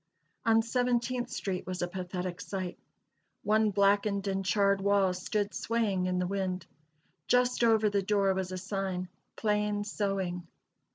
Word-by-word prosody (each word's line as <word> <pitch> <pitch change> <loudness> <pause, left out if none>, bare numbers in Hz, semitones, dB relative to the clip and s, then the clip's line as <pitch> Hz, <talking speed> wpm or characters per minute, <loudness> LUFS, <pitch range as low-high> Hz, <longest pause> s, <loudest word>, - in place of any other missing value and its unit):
On 225 0 +5
Seventeenth 245 +1 0
street 185 -2 -3
was 185 -1 -3
a - - 0
pathetic 180 0 -4
sight. 185 -3 -5 0.6
One 215 +1 +3
blackened 200 0 +2
and 195 0 -1
charred 200 +1 +2
wall 200 -2 +3
stood 205 +3 -2
swaying 210 -6 0
in 180 0 0
the 180 - +1
wind. 185 -2 -2 0.6
Just 250 -1 +3
over 220 -2 +4
the 200 -1 +1
door 195 0 +2
was 190 -1 -3
a 185 - -3
sign 190 -1 -3 0.3
"Plain 210 -1 0
Sewing." 195 -4 -2
200 Hz, 145 wpm, -30 LUFS, 185-210 Hz, 0.6 s, On